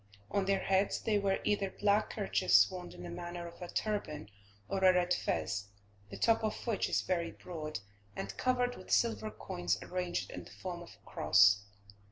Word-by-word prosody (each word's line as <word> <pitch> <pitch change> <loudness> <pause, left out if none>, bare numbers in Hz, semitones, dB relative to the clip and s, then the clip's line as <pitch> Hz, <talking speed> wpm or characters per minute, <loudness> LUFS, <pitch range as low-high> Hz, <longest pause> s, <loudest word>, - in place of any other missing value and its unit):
On 200 -1 +1
their 195 0 +2
heads 195 +1 +2
they 210 -2 +1
wear 195 -1 +1
either 200 -2 +1
black 205 +2 +2
kerchiefs 100 - +4
wound 180 -1 -7
in - - -9
the 175 - -6
manner 175 0 -5
of 170 +2 -13
a 175 - -5
turban, 160 - -3 0.4
or 195 -1 -2
a 185 - +8
red 180 0 +2
fez, 100 - -1 0.4
the - - -7
top 225 -1 +3
of 215 - -2
which 230 -4 0
is - - +2
very 170 -2 0
broad, 155 - -6 0.3
and 100 0 -5
covered 250 -1 +1
with - - -12
silver 225 -2 +2
coins 90 - -2
arranged 180 -1 -3
in - - -6
the - - -13
form 175 -2 -6
of 175 - -12
a - - -25
cross. 100 0 +5
180 Hz, 190 wpm, -33 LUFS, 170-205 Hz, 0.4 s, a